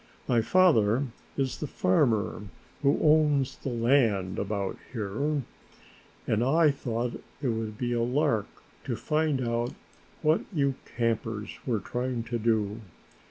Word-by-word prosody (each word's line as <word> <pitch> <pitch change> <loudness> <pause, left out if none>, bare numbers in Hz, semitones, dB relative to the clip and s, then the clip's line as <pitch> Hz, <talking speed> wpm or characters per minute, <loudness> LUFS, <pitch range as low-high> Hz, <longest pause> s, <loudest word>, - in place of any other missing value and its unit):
My 120 -2 +3
father 135 - +4 0.3
is 135 -2 -1
the 150 - -3
farmer 110 0 +1 0.4
who 140 0 +3
owns 150 -3 +3
the - - -4
land 115 -6 +2
about 100 -1 -2 0.2
here 130 +6 -1 0.8
and 110 +1 +1
I 155 +4 +4
thought 120 -3 -3 0.2
it 140 -3 -1
would 110 -2 -3
be 120 0 -1
a 120 - +1
lark 125 -3 +1 0.4
to - - -1
find 150 -5 0
out 115 +1 -1 0.5
what 155 +2 +4
you 140 -6 +1 0.2
campers 110 -2 -1 0.2
were 115 -4 +1
trying 125 -1 -2
to 120 0 -3
do. 110 -1 0
120 Hz, 130 wpm, -28 LUFS, 110-140 Hz, 0.8 s, father